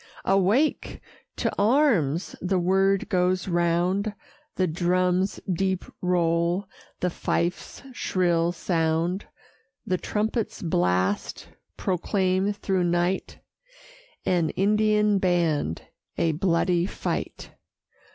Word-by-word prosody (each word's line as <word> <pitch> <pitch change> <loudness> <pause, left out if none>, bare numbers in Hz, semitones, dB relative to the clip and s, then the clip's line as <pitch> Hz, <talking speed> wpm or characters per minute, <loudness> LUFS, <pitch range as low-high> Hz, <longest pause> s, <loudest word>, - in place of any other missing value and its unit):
Awake! 195 +10 +1 0.4
to - - -1
arms! 205 - +2
the 185 +1 0
word 195 +2 +2
goes 185 +1 +1
round; 180 +4 +1 0.4
The 185 - +2
drum's 180 +2 +1
deep 190 +1 -1 0.2
roll, 175 +1 +1 0.4
the 180 - 0
fife's 175 +7 -2
shrill 175 -6 +1
sound, 170 +2 -1 0.6
The 185 -4 -1
trumpet's 220 0 -2
blast, 90 - 0 0.3
proclaim 190 +1 0
through 190 -3 -1
night, 175 +2 0 0.9
An 170 -3 +2
Indian 210 0 +2
band, 165 - 0 0.3
a 165 -1 +2
bloody 175 +1 +1
fight. - - -4
180 Hz, 90 wpm, -25 LUFS, 170-195 Hz, 0.9 s, arms